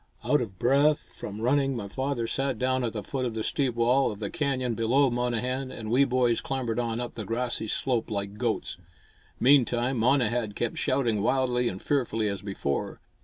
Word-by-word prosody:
Out 150 - +3
of 95 -6 -5
breath 140 +6 +2
from 105 +1 -7
running, 135 +2 +2
my 105 -4 -4
father 130 +2 -2
sat 135 +2 -1
down 130 +1 0
at 115 - -1
the 105 -3 -4
foot 135 -2 -3
of 120 -3 -2
the 110 - -2
steep 130 -1 0
wall 125 +3 +3
of 105 - -7
the 100 -1 -4
canyon 130 -4 -1
below 125 +4 +2
Monnehan 125 +2 -1
and 110 -2 -6
we 135 +3 +5
boys 125 -3 +2
clambered 125 -4 -2
on 115 -1 -1
up 120 -1 -4
the 110 - -5
grassy 115 +2 -2
slope 120 +1 -1
like 100 -1 -4
goats. 115 -6 -1 0.6
Meantime, 125 -1 +3
Monnehan 120 -3 +2
kept 120 +2 -2
shouting 120 -6 +1
wildly 125 +1 +1
and 95 - -7
fearfully 115 -6 0
as 100 -2 -4
before. 95 -9 -3
120 Hz, 185 wpm, -27 LUFS, 110-130 Hz, 0.6 s, we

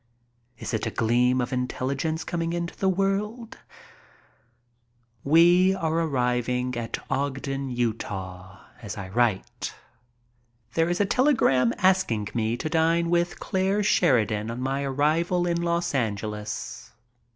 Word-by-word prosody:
Is - - -6
it 110 - -1
a - - 0
gleam 125 +3 +2
of 125 - -3
intelligence 135 +5 -2
coming 170 -1 -2
into 170 0 -3
the 190 - +1
world? 200 +5 -1 1.6
We 175 +5 +5
are 160 -4 -1
arriving 125 -5 0
at 115 -1 -3
Ogden, 135 0 -2
Utah, 100 -6 -4 0.2
as 105 -1 -6
I 95 -2 -6
write. 110 -2 -1 1.0
There 165 +1 +2
is 175 - -1
a 205 - +3
telegram 195 - +3
asking 180 - +2
me 115 0 0
to 145 - -3
dine 165 +1 +2
with 175 0 +1
Clare 195 +1 0
Sheridan 115 - +2
on 115 +1 -5
my 135 +2 -1
arrival 155 +6 +1
in 170 -1 0
Los 170 0 0
Angeles. 105 - -4
135 Hz, 125 wpm, -26 LUFS, 115-170 Hz, 1.6 s, We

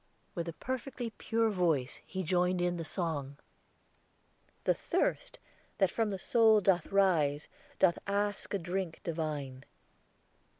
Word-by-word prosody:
With 170 -2 -3
a - - -5
perfectly 255 - -4
pure 225 0 +1
voice 165 -9 0
he 190 0 -3
joined 180 +1 +1
in 175 0 0
the 165 - -3
song: 155 -5 -3 1.3
"The - - +3
thirst - - -1 0.4
that 190 -3 +3
from 225 -2 0
the 195 - -2
soul 220 +2 +5
doth 185 -4 +2
rise, 165 -7 +2 0.3
Doth 175 -3 +4
ask 205 0 -1
a - - +2
drink 175 -1 -3
divine." 150 -5 -3
180 Hz, 130 wpm, -32 LUFS, 160-205 Hz, 1.3 s, soul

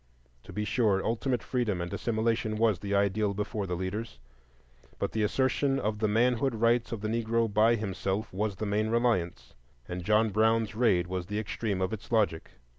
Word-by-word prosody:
To - - -10
be 105 +3 -3
sure, 105 -3 +1
ultimate 120 +1 -1
freedom 115 -8 -1
and 85 0 -4
assimilation 110 -1 0
was 110 -4 +2
the 100 +1 -2
ideal 100 +1 +1
before 105 0 -3
the 90 - -2
leaders, 95 - -4 0.8
but - - -2
the 110 - -1
assertion 130 +5 +1
of 105 -3 -2
the 110 - +2
manhood 120 +3 +2
rights 115 +1 +2
of 115 -3 -4
the 110 - -2
Negro 115 +1 +1
by 110 +3 +5
himself 100 -1 -3
was 105 +1 -1
the 110 - -4
main 105 +1 0
reliance, 115 -7 0 0.3
and 90 0 -5
John 105 +3 +3
Brown's 110 0 +2
raid 105 -6 +2
was 90 0 -4
the 105 - -3
extreme 105 -2 -2
of 95 - -1
its 110 - -8
logic. 105 -8 +1
110 Hz, 185 wpm, -29 LUFS, 100-115 Hz, 0.8 s, by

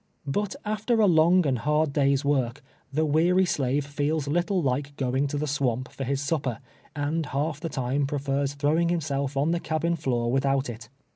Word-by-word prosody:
But 200 +8 -1
after 215 +2 0
a 215 - +6
long 175 0 +5
and 130 -4 +1
hard 150 +2 +1
day's 140 -1 +2
W' 140 -2 +3
ork, 130 +5 -11 0.3
the 155 +3 +1
weary 175 +5 +3
slave 140 -3 0
feels 145 +1 -1
little 175 +6 +1
like 140 -1 -1
going 130 +2 0
to 145 - -3
the 150 - -1
swamp 130 -4 -1
for 135 - -5
his 135 +1 -1
sup})er, 140 -5 -1 0.4
and 150 +2 -1
half 145 +2 -2
the 165 - -4
time 135 0 -1
prefers 140 0 -1
throwing 155 +4 +2
himself 140 -5 -1
on 145 +4 +2
the 170 - +1
cabin 170 +1 -1
floor 120 -6 -1
with 135 +1 +1
out 135 -2 +1
it. 110 -1 -11
145 Hz, 195 wpm, -26 LUFS, 135-160 Hz, 0.4 s, a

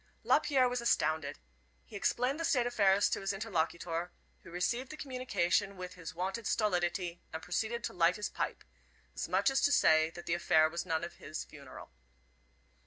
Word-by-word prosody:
Lapierre 265 -3 +3
was 245 0 -2
astounded. 155 -10 +1 0.5
He - - -13
explained 250 +8 0
the - - -2
state 260 -7 +2
of 245 - -2
affairs 200 -2 +4
to - - -1
his 195 +1 -1
interlocuter, 170 -4 -2 0.3
who - - -13
received 210 +10 -1
the 310 - -8
communication 200 - 0
with 180 0 -7
his 165 -3 -8
wonted 190 +6 -3
stolidity, 175 -3 0
and 160 - -4
proceeded 220 +6 -2
to - - -3
light 175 0 +3
his 210 -2 -2
pipe, - - -4 0.5
as - - -4
much 195 +6 +3
as 270 - +2
to 285 - +3
say 160 - +5
that 175 +1 -10
the 170 - 0
affair 160 -2 +4
was 170 +3 -4
none 160 -1 0
of 170 - -7
his 155 +2 -6
funeral. 140 - -12
185 Hz, 180 wpm, -32 LUFS, 170-235 Hz, 0.5 s, say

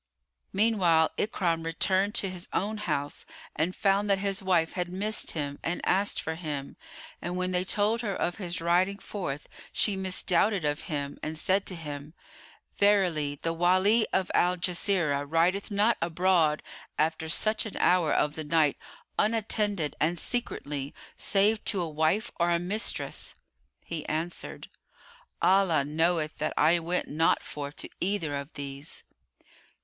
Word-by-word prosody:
Meanwhile 190 -6 +3
Ikrimah 170 -6 0
returned 190 +5 +1
to 200 - +1
his 180 -1 -7
own 215 +3 -1
house 145 -8 -2 0.3
and 170 +4 -1
found 200 +1 +2
that 195 - +4
his 195 0 -1
wife 175 -4 +2
had 180 -1 -2
missed 205 +4 -1
him 145 -3 -4
and 175 +2 -2
asked 200 +2 +2
for 160 - -3
him, 150 -4 -5 0.5
and 175 +1 -3
when 185 0 -1
they 180 0 +1
told 210 +4 +1
her 205 -5 -2
of 175 - -1
his 180 -4 -3
riding 180 +4 +2
forth, 180 -8 -5 0.2
she 205 - +2
misdoubted 190 0 +2
of 145 +1 -1
him, 145 -3 -4
and 155 +1 -4
said 190 +5 +1
to 185 - -2
him, 150 -1 -7 0.6
"Verily 175 -8 +3
the 165 - 0
Wali 185 +6 +4
of 190 -1 0
Al 180 +1 +3
Jazirah 170 -5 0
rideth 175 +6 +2
not 210 +3 +3
abroad 170 -2 +2 0.3
after 160 +1 0
such 215 +6 +1
an 210 - -7
hour 180 -4 +3
of 150 - +2
the 155 - -5
night, 150 -1 +2 0.4
unattended 210 -6 +1
and 170 +3 +1
secretly, 145 - -3 0.2
save 210 +2 +2
to 195 - +2
a 175 - -1
wife 160 +7 0
or 170 0 +3
a 170 - +3
mistress." 195 +6 -2 0.5
He 165 -3 -4
answered, 165 +3 -4 0.8
"Allah 185 -7 +4
knoweth 160 +1 0
that 155 - -2
I 165 +3 +4
went 175 +2 -1
not 160 +3 +2
forth 145 -1 -6
to - - -6
either 180 -6 -1
of 140 +2 -6
these." 140 +1 -6
175 Hz, 150 wpm, -28 LUFS, 155-195 Hz, 0.8 s, that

